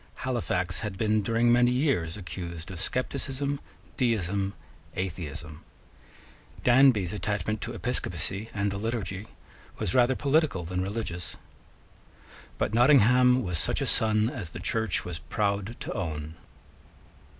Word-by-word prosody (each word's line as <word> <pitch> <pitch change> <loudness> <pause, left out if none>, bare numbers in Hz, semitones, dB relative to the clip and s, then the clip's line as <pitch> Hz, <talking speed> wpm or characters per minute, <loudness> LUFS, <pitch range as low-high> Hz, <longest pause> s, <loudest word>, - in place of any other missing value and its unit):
Halifax 95 -8 -1
had 105 -4 -4
been 110 0 +2
during 115 +3 +2
many 120 0 +5
years 125 - +1
accused 85 -3 -6
of 90 - -4
scepticism, 135 - 0 0.4
deism, 100 -5 0 0.4
atheism. 85 -4 -5 1.0
Danby's 120 -7 +5
attachment 105 0 -2
to - - -4
episcopacy 105 +4 -2
and 100 -1 -1
the 100 - -4
liturgy 105 -3 -3 0.5
was - - -1
rather 130 0 +4
political 145 - +1
than 90 +2 -2
religious. 95 -4 -4 1.2
But - - -1
Nottingham 125 0 +5
was 90 -5 -1
such - - 0
a - - 0
son 110 0 +3
as 105 - -5
the - - -8
Church 110 -1 0
was 85 -2 -4
proud 100 +7 -2
to - - -4
own. 75 -2 -4
105 Hz, 125 wpm, -28 LUFS, 90-120 Hz, 1.2 s, many